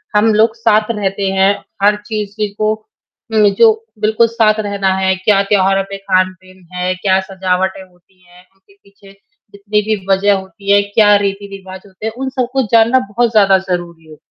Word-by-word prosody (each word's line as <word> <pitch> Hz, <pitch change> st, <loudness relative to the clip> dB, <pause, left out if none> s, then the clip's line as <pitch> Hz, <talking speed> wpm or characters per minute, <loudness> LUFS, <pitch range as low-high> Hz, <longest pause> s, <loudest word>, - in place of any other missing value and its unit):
हम 215 Hz, +1 st, +3 dB
लोग 220 Hz, +1 st, +3 dB
साथ 215 Hz, -1 st, +1 dB
रहते 200 Hz, -2 st, -2 dB
हैं, 195 Hz, +1 st, +3 dB, 0.3 s
हर 205 Hz, +1 st, +4 dB
चीज़, 210 Hz, -2 st, -4 dB
ज़ी 210 Hz, -, +1 dB
को, 215 Hz, +1 st, 0 dB, 0.6 s
में 210 Hz, -2 st, +3 dB
जो 225 Hz, +1 st, +6 dB, 0.3 s
बिल्कुल 220 Hz, +2 st, +2 dB
साथ 220 Hz, -2 st, +1 dB
रहना 200 Hz, -2 st, -1 dB
है, 190 Hz, 0 st, +1 dB
क्या 195 Hz, +1 st, +2 dB
त्योहारों 195 Hz, -1 st, +1 dB
पे 195 Hz, -, -6 dB
खान-पीन 185 Hz, -1 st, -2 dB
है, 180 Hz, 0 st, -2 dB
क्या 190 Hz, 0 st, +1 dB
सजावटें 190 Hz, 0 st, -2 dB
होती 185 Hz, 0 st, -27 dB
हैं? 180 Hz, +1 st, -20 dB
उनके 195 Hz, +1 st, -27 dB
पीछे 200 Hz, 0 st, -20 dB, 0.4 s
जितनी 205 Hz, +1 st, -1 dB
भी 210 Hz, -2 st, -3 dB
वजह 195 Hz, +1 st, +3 dB
होती 195 Hz, +1 st, -4 dB
है, 200 Hz, 0 st, +5 dB
क्या 205 Hz, 0 st, +3 dB
रीति-रिवाज 195 Hz, -1 st, -6 dB
होते 195 Hz, +2 st, -11 dB
हैं? 220 Hz, -, -3 dB
उन 265 Hz, +1 st, -3 dB
सब 255 Hz, -2 st, -2 dB
को 270 Hz, -1 st, +1 dB
जानना 230 Hz, +3 st, +5 dB
बहुत 235 Hz, +2 st, 0 dB
ज़्यादा 200 Hz, -3 st, +4 dB
ज़रूरी 170 Hz, -2 st, -5 dB
हो 155 Hz, -, -13 dB
200 Hz, 180 wpm, -15 LUFS, 190-215 Hz, 0.6 s, जो